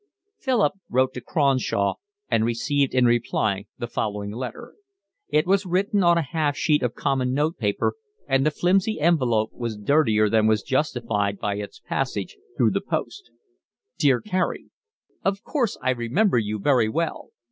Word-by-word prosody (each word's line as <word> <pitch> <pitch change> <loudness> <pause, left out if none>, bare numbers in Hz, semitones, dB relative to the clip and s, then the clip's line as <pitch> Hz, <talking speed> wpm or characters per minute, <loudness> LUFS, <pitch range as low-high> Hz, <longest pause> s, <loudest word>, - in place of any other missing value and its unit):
Philip 250 -7 +2 0.2
wrote 130 +1 +2
to 125 - -6
Cronshaw 130 -9 +1 0.3
and 110 - +2
received 130 +4 0
in 125 -1 +4
reply 110 -4 +1
the - - -4
following 105 -3 -3
letter. 130 - -7 0.6
It 155 +1 +2
was 195 +1 +2
written 195 +3 +1
on 170 -1 +5
a 170 - +1
half 145 0 -1
sheet 150 0 +2
of 125 -2 -1
common 130 -2 0
note 155 +4 0
paper, 105 -2 0 0.3
and 135 0 +2
the 155 - +3
flimsy 190 +6 +1
envelope 125 -9 +2
was 115 -3 -4
dirtier 110 -2 +3
than 110 0 +3
was 110 -2 +2
justified 115 -8 -1
by 100 0 -2
its 105 - -7
passage - - -3 0.2
through - - +3
the - - -1
post. 405 - -4 0.7
Dear 135 -6 +3
Carey, 185 -3 -2 0.5
Of 195 +1 -1
course 245 -8 -1
I 130 - +2
remember 125 - +1
you 105 -1 -2
very 120 -1 +2
well. 165 +6 -3
130 Hz, 160 wpm, -24 LUFS, 110-170 Hz, 0.7 s, on